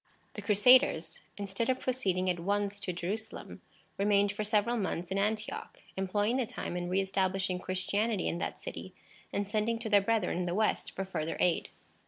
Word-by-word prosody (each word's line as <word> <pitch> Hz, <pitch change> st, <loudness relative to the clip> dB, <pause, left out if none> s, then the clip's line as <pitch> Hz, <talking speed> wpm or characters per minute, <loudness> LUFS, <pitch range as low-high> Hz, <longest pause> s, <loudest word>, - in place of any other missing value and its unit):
The -, -, -6 dB
Crusaders, 250 Hz, +6 st, +4 dB, 0.2 s
instead 200 Hz, +4 st, -2 dB
of 260 Hz, -, +2 dB
proceeding 190 Hz, -8 st, 0 dB
at 180 Hz, -1 st, +1 dB
once 200 Hz, +2 st, -1 dB
to 195 Hz, -2 st, -3 dB
Jerusalem, 190 Hz, +6 st, -4 dB, 0.4 s
remained 200 Hz, 0 st, +3 dB
for 205 Hz, +1 st, -3 dB
several 210 Hz, +2 st, +2 dB
months 185 Hz, -5 st, -2 dB
in 195 Hz, -, +1 dB
Antioch, 215 Hz, +1 st, -2 dB, 0.2 s
employing 205 Hz, +5 st, 0 dB
the 255 Hz, -4 st, 0 dB
time 175 Hz, -, -5 dB
in 175 Hz, 0 st, -3 dB
re 185 Hz, +2 st, +2 dB
establishing 190 Hz, -1 st, 0 dB
Christianity 200 Hz, +3 st, 0 dB
in 170 Hz, -, -1 dB
that -, -, -3 dB
city, -, -, -7 dB, 0.4 s
and 200 Hz, -, -1 dB
sending 215 Hz, +2 st, 0 dB
to 225 Hz, -1 st, -5 dB
their 205 Hz, -1 st, +6 dB
brethren 200 Hz, -4 st, +1 dB
in 180 Hz, -, -1 dB
the 175 Hz, -, -1 dB
West 215 Hz, +1 st, 0 dB
for 195 Hz, -, -2 dB
further 165 Hz, -4 st, -3 dB
aid. 175 Hz, -2 st, +2 dB
200 Hz, 180 wpm, -31 LUFS, 185-215 Hz, 0.4 s, their